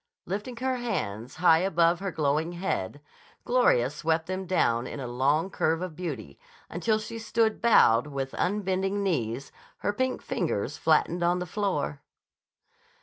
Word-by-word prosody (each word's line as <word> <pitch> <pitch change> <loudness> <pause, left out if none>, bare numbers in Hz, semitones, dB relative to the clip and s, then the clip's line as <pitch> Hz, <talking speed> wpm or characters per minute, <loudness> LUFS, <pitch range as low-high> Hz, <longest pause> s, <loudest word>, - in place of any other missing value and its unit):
Lifting 210 +6 -4
her 260 +1 -1
hands 120 - -3
high 160 -1 +5
above 170 -2 +2
her 195 0 -3
glowing 155 +2 0
head, 145 - -3 0.4
Gloria 145 - +3
swept 160 +2 0
them 185 +1 -4
down 120 -9 +1
in 145 - -6
a 135 - -4
long 140 +9 +1
curve 160 -1 +1
of 180 -4 -6
beauty, 140 - -6 0.3
until 215 +6 +1
she 230 +1 -6
stood 225 -1 0
bowed 145 - +5
but 150 - -10
with 135 -1 -3
unbending 195 0 0
knees, 135 - -2 0.3
her 205 - +2
pink 260 +4 -1
fingers - - -2
flattened 175 - +2
on 175 +1 +3
the 180 - -3
floor. 180 -7 -2
175 Hz, 150 wpm, -27 LUFS, 145-200 Hz, 0.4 s, high